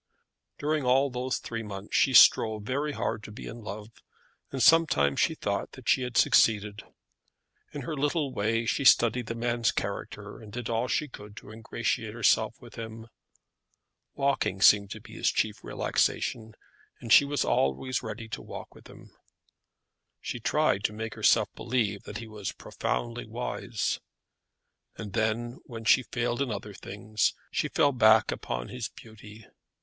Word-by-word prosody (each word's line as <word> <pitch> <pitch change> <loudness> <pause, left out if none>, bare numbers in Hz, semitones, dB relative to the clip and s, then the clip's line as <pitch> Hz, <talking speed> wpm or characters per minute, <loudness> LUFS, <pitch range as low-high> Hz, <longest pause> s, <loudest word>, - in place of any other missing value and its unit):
During 150 0 -1
all 130 +2 +3
those 125 +1 -2
three 115 -1 -5
months 100 -2 -7
she 130 - +3
strove 110 -1 +6
very 140 +6 -2
hard 110 - -2
to 105 - -10
be 110 - -9
in 115 +1 -8
love, 105 +1 -8 0.6
and 135 -3 -1
sometimes 130 - +4
she - - +2
thought - - -3
that - - -12
she - - +4
had 125 -1 -3
succeeded. 105 -1 +3 0.9
In 145 - -6
her 155 +4 -4
little 145 -1 -1
way 115 +1 0
she 140 - 0
studied 120 -2 +4
the 115 - -4
man's 120 0 0
character, 100 +1 -5
and 105 -2 -12
did 120 +1 -5
all 115 +2 0
she 150 - 0
could 105 -5 -12
to 105 - -11
ingratiate 110 0 -3
herself 110 -1 +2
with 120 -3 -12
him. 115 0 -8 1.1
Walking 140 -8 0
seemed 100 0 +6
to - - -8
be - - -14
his - - +1
chief - - -1
relaxation, 110 -2 -1 0.4
and 115 - +1
she - - +9
was 145 0 -1
always 70 - 0
ready 115 0 -6
to - - -5
walk - - -9
with - - -16
him. - - -15 1.1
She 120 - -5
tried 135 -4 +1
to - - 0
make 110 +1 -5
herself - - +3
believe 110 -5 -1
that 105 - -6
he 115 - -8
was 105 -2 -6
profoundly 120 -1 -4
wise. 115 -1 -3 1.0
And 105 -3 -7
then, 115 +3 -1
when 115 -2 -9
she 130 - +6
failed 120 +1 -2
in 140 - 0
other 105 -1 -5
things, 105 +2 -2 0.2
she - - 0
fell 145 - +2
back 110 -4 +5
upon - - -4
his - - -5
beauty. 110 -1 -14
115 Hz, 165 wpm, -28 LUFS, 105-125 Hz, 1.1 s, she